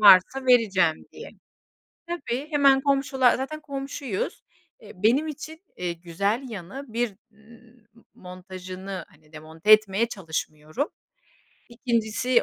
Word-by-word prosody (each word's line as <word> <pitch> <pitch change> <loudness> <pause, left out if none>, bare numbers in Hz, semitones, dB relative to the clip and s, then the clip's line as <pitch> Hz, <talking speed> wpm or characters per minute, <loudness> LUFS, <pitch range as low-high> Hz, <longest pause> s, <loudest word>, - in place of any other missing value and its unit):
varsa 210 +6 +7
vereceğim 195 -9 +4
diye. - - -9 0.8
Tabii, 295 -5 -3
hemen 280 -3 +5
komşular, 270 -2 +3
zaten 290 +4 -4
komşuyuz. 275 -6 -4 0.4
Eee, - - -12
benim 265 +9 +4
için, 315 +3 -8
eee, 180 -1 -2
güzel 180 +8 -1
yanı. 220 +6 -7
1, 235 -2 0 0.2
ımm, 225 +1 -20 0.3
montajını 185 +1 -8
hani 155 -5 -24
demonte 160 +6 +1
etmeye 215 +1 +5
çalışmıyorum. 160 - -4 0.8
2.si 235 0 +1
225 Hz, 105 wpm, -25 LUFS, 185-270 Hz, 0.8 s, varsa